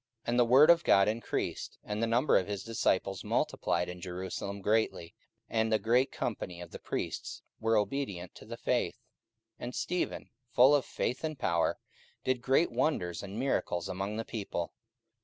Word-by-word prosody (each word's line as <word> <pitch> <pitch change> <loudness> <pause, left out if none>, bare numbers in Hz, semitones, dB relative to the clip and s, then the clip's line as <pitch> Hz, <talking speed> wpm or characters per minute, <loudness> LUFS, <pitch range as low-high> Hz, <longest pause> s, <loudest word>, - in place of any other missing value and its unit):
44:006:007 - - -5
And 120 +1 +2
the 120 - +6
word 130 +6 +7
of 170 0 +4
God 100 -7 +5
increased; 110 +1 -2
and 105 +1 -3
the 115 - +2
number 120 +6 +3
of 95 - +3
the 105 -1 -2
disciples 95 -3 0
multiplied 90 - 0
in 90 0 -7
Jerusalem 95 +3 -4
greatly; 105 -5 0 0.3
and 110 0 0
a 110 - +5
great 120 +6 +2
company 90 -6 -4
of 85 -1 -9
the - - -8
priests - - -4 0.2
were 115 0 +2
obedient 105 -6 -2
to - - -13
the - - -7
faith. - - 0
44:006:008 - - -37 0.6
And 125 - -5
Stephen, 180 0 -2 0.2
full 130 +4 +6
of 145 -3 +3
faith 125 - -2
and 155 -2 -2
power, 85 -7 +1 0.5
did 130 -2 0
great 135 +5 +3
wonders 115 - 0
and 100 +1 -7
miracles 120 -8 0
among 100 +3 -3
the 115 - -3
people. 100 -6 -4
110 Hz, 175 wpm, -31 LUFS, 95-125 Hz, 0.6 s, word